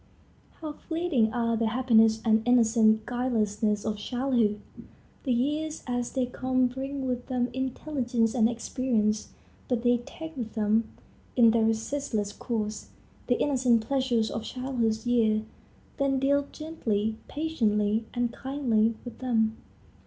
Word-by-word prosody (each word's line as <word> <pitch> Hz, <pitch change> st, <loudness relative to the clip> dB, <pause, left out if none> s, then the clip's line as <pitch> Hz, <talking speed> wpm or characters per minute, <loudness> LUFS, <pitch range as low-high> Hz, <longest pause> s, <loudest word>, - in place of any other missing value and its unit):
How 310 Hz, -2 st, -4 dB
fleeting 320 Hz, -9 st, 0 dB
are 230 Hz, -1 st, 0 dB
the 225 Hz, 0 st, +1 dB
happiness 225 Hz, -2 st, +3 dB
and 220 Hz, -1 st, +4 dB
innocent 225 Hz, -2 st, +4 dB
guilelessness 215 Hz, -4 st, 0 dB
of 215 Hz, -1 st, -1 dB
childhood! 240 Hz, -2 st, 0 dB, 0.7 s
The 260 Hz, -, +1 dB
years 300 Hz, +6 st, -1 dB
as 245 Hz, -1 st, -2 dB
they 260 Hz, -2 st, +1 dB
come 255 Hz, +1 st, 0 dB
bring 265 Hz, +2 st, -3 dB
with 250 Hz, -1 st, -3 dB
them 250 Hz, -1 st, 0 dB
intelligence 255 Hz, -3 st, -1 dB
and 230 Hz, -3 st, +3 dB
experience; 230 Hz, -3 st, 0 dB, 0.4 s
but 245 Hz, -2 st, -1 dB
they 245 Hz, 0 st, +4 dB
take 320 Hz, +6 st, -9 dB
with 235 Hz, -4 st, -5 dB
them, 220 Hz, 0 st, +1 dB, 0.5 s
in 230 Hz, -3 st, +6 dB
their 225 Hz, -1 st, +3 dB
resistless 225 Hz, -2 st, -1 dB
course, 215 Hz, -3 st, -4 dB, 0.4 s
the 245 Hz, -, +2 dB
innocent 250 Hz, -5 st, +2 dB
pleasures 250 Hz, -4 st, +1 dB
of 225 Hz, -, -3 dB
childhood's 235 Hz, -3 st, -2 dB
years. 220 Hz, -3 st, +2 dB, 0.5 s
Then 275 Hz, -1 st, +1 dB
deal 280 Hz, +1 st, +2 dB
gently, 220 Hz, -9 st, -2 dB
patiently, 220 Hz, -8 st, 0 dB
and 240 Hz, -1 st, 0 dB
kindly 235 Hz, -5 st, +1 dB
with 245 Hz, -, -9 dB
them. 225 Hz, -3 st, +1 dB
240 Hz, 130 wpm, -28 LUFS, 220-260 Hz, 0.7 s, in